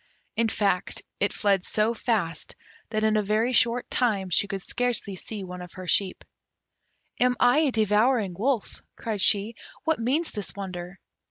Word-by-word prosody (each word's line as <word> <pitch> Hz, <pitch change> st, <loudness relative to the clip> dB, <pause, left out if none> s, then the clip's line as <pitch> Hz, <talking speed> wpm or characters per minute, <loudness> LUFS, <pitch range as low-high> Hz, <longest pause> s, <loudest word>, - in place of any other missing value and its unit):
In 230 Hz, -, +2 dB
fact, 195 Hz, -4 st, 0 dB, 0.2 s
it 200 Hz, -, +2 dB
fled 200 Hz, -3 st, +1 dB
so 215 Hz, +4 st, +1 dB
fast 205 Hz, -9 st, -2 dB, 0.3 s
that 215 Hz, -1 st, -1 dB
in 220 Hz, 0 st, +3 dB
a -, -, +3 dB
very 215 Hz, +5 st, +1 dB
short 240 Hz, +1 st, +2 dB
time 200 Hz, -7 st, +1 dB
she 200 Hz, -, +3 dB
could 195 Hz, -2 st, -4 dB
scarcely 245 Hz, -5 st, -1 dB
see 205 Hz, +2 st, -7 dB
one 180 Hz, -1 st, -7 dB
of 180 Hz, -1 st, -10 dB
her 185 Hz, -1 st, -8 dB
sheep. 190 Hz, +1 st, +1 dB, 0.9 s
"Am 250 Hz, 0 st, +3 dB
I 245 Hz, +4 st, +5 dB
a 305 Hz, -4 st, +3 dB
devouring 215 Hz, -1 st, +2 dB
wolf?" 235 Hz, +3 st, -1 dB, 0.2 s
cried 215 Hz, -3 st, -3 dB
she: 205 Hz, +3 st, +3 dB, 0.3 s
"what 320 Hz, -4 st, +1 dB
means 285 Hz, +8 st, 0 dB
this 205 Hz, -3 st, -5 dB
wonder?" 185 Hz, -2 st, -6 dB
215 Hz, 165 wpm, -26 LUFS, 195-235 Hz, 0.9 s, I